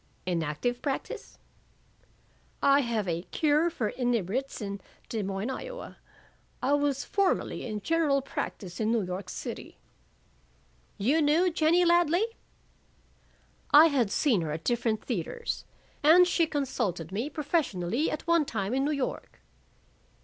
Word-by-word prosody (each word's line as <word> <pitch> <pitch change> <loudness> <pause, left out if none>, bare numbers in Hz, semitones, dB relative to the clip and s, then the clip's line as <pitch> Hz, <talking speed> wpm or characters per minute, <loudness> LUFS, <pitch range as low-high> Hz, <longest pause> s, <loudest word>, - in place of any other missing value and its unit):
"In 175 -2 0
active 160 +11 -2
practise?" 275 -2 -4 1.3
"I 280 0 +6
have 230 -6 -1
a 170 -1 -1
Cure 310 +1 +2
for 240 -10 -2
Inebriates 245 +1 -1
in 200 -2 -5 0.3
Des 225 - -2
Moines, 195 +5 -3
Iowa. - - -7 0.6
I 275 - +1
was 285 -1 +1
formerly 395 -9 0
in 210 -2 -4
general 300 -1 +1
practise 185 -8 -5
in 220 0 +1
New 230 -3 +2
York 185 +2 -5
City." - - -7 1.2
"You 275 +11 +2
knew 320 +5 +3
Jennie 335 +2 +3
Ladley?" 345 +3 +4 1.4
"I 305 +3 +8
had 255 -8 +1
seen 225 - +2
her 155 -2 -3
at 160 +2 -5
different 230 -3 0
theaters. 475 -1 -3 0.4
And 350 +4 +7
she 335 -2 +2
consulted 235 - -2
me 225 +9 -2
professionally 285 - -1
at 305 - -4
one 335 -2 +3
time 210 -3 -3
in 270 +1 +1
New - - +1
York." 280 -3 -4
265 Hz, 135 wpm, -28 LUFS, 205-310 Hz, 1.4 s, I